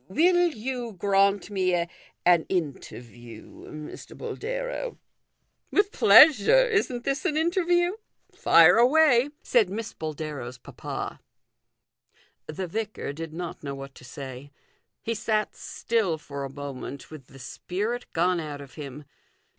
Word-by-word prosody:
" -, -, -39 dB
Will 350 Hz, -, +3 dB
you 245 Hz, -4 st, -4 dB
grant 195 Hz, +1 st, +2 dB
me 185 Hz, -2 st, +1 dB, 0.5 s
an 175 Hz, -2 st, +5 dB
interview, 120 Hz, -, -6 dB, 0.2 s
Mr. 150 Hz, 0 st, -9 dB
Boldero? -, -, -4 dB, 0.2 s
" -, -, -51 dB
" -, -, -47 dB
With 405 Hz, 0 st, +2 dB
pleasure; 315 Hz, -, +7 dB
isn't 390 Hz, -, 0 dB
this 275 Hz, +2 st, -1 dB
an 305 Hz, -, 0 dB
interview? 350 Hz, +1 st, +2 dB, 0.4 s
Fire 170 Hz, +4 st, +6 dB
away," 260 Hz, +1 st, +5 dB
said 225 Hz, -7 st, +3 dB
Miss 220 Hz, +3 st, -5 dB
Boldero's 150 Hz, -5 st, -6 dB
papa. -, -, -7 dB, 1.3 s
The 170 Hz, +5 st, -4 dB
vicar 210 Hz, -5 st, -4 dB
did 165 Hz, +1 st, -7 dB
not 170 Hz, +1 st, -6 dB
know 140 Hz, -1 st, -4 dB
what 135 Hz, 0 st, -9 dB
to -, -, -15 dB
say. 130 Hz, +1 st, -9 dB, 0.5 s
He 230 Hz, -, -1 dB
sat 215 Hz, -1 st, -1 dB
still 215 Hz, -8 st, -1 dB
for 140 Hz, -2 st, -6 dB
a -, -, -6 dB
moment 140 Hz, 0 st, -8 dB
with 150 Hz, -5 st, -11 dB
the 135 Hz, -, -15 dB
spirit 205 Hz, -, -4 dB
gone 175 Hz, +1 st, +1 dB
out 150 Hz, -3 st, -6 dB
of 140 Hz, -3 st, -12 dB
him. 145 Hz, -1 st, -8 dB
185 Hz, 135 wpm, -26 LUFS, -, 1.3 s, pleasure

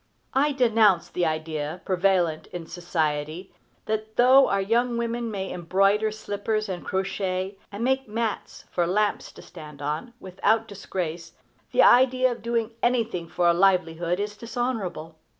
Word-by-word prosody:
I 290 Hz, +3 st, +3 dB
denounce 225 Hz, -9 st, +3 dB
the 175 Hz, -2 st, 0 dB
idea, 155 Hz, +1 st, -3 dB
prevalent 180 Hz, -4 st, +1 dB
in 175 Hz, -2 st, -7 dB
society, 160 Hz, 0 st, -3 dB, 0.3 s
that 220 Hz, 0 st, -3 dB
though 260 Hz, +2 st, +6 dB
our 200 Hz, -, +1 dB
young 235 Hz, +4 st, +1 dB
women 235 Hz, 0 st, -2 dB
may 195 Hz, -3 st, -4 dB
embroider 195 Hz, +5 st, +2 dB
slippers, 215 Hz, 0 st, -3 dB
and 185 Hz, -2 st, -5 dB
crochet, 190 Hz, 0 st, -2 dB
and 205 Hz, +3 st, -5 dB
make 265 Hz, +1 st, +1 dB
mats 220 Hz, 0 st, -4 dB
for 175 Hz, -1 st, 0 dB
lamps 210 Hz, +3 st, 0 dB
to -, -, -13 dB
stand 150 Hz, -4 st, -12 dB
on, 150 Hz, +12 st, -4 dB
without 210 Hz, +4 st, 0 dB
disgrace, 175 Hz, -4 st, -5 dB, 0.4 s
the -, -, +5 dB
idea 255 Hz, 0 st, +5 dB
of 240 Hz, -, -6 dB
doing 230 Hz, -1 st, -1 dB
anything 230 Hz, -8 st, 0 dB
for 175 Hz, +1 st, 0 dB
a 170 Hz, -, +5 dB
livelihood 175 Hz, -1 st, +2 dB
is 205 Hz, 0 st, -3 dB
dishonorable. 210 Hz, -9 st, -4 dB
195 Hz, 145 wpm, -25 LUFS, 175-230 Hz, 0.4 s, though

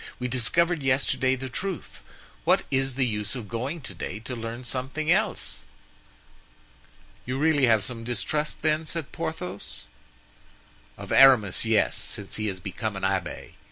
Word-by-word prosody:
We 125 Hz, -, -2 dB
discovered 155 Hz, +7 st, +2 dB
yesterday 130 Hz, -1 st, +2 dB
the 130 Hz, +1 st, -5 dB
truth; 185 Hz, +7 st, -5 dB, 0.4 s
what -, -, +4 dB
is 135 Hz, -1 st, +1 dB
the 135 Hz, -1 st, +2 dB
use 105 Hz, -1 st, -2 dB
of 120 Hz, -5 st, -6 dB
going 130 Hz, -, -3 dB
to 95 Hz, -, -6 dB
day 90 Hz, +2 st, -5 dB
to 125 Hz, +2 st, -5 dB
learn 115 Hz, +2 st, -5 dB
something 135 Hz, +6 st, -1 dB
else?" 210 Hz, +2 st, +1 dB, 1.6 s
"You 125 Hz, +1 st, -3 dB
really 145 Hz, -2 st, +4 dB
have 110 Hz, -3 st, +4 dB
some 115 Hz, +1 st, -4 dB
distrust, 135 Hz, +7 st, -2 dB
then?" 155 Hz, 0 st, +1 dB
said 165 Hz, -3 st, -4 dB
Porthos. 105 Hz, -, -5 dB, 1.1 s
"Of -, -, -8 dB
Aramis, 120 Hz, -8 st, +6 dB
yes, 110 Hz, -2 st, +3 dB
since 100 Hz, -2 st, -3 dB
he 110 Hz, 0 st, -1 dB
has 95 Hz, -2 st, -3 dB
become 100 Hz, +3 st, -4 dB
an 95 Hz, -, -5 dB
abbé. 95 Hz, -2 st, -1 dB
125 Hz, 150 wpm, -26 LUFS, 110-150 Hz, 1.6 s, Aramis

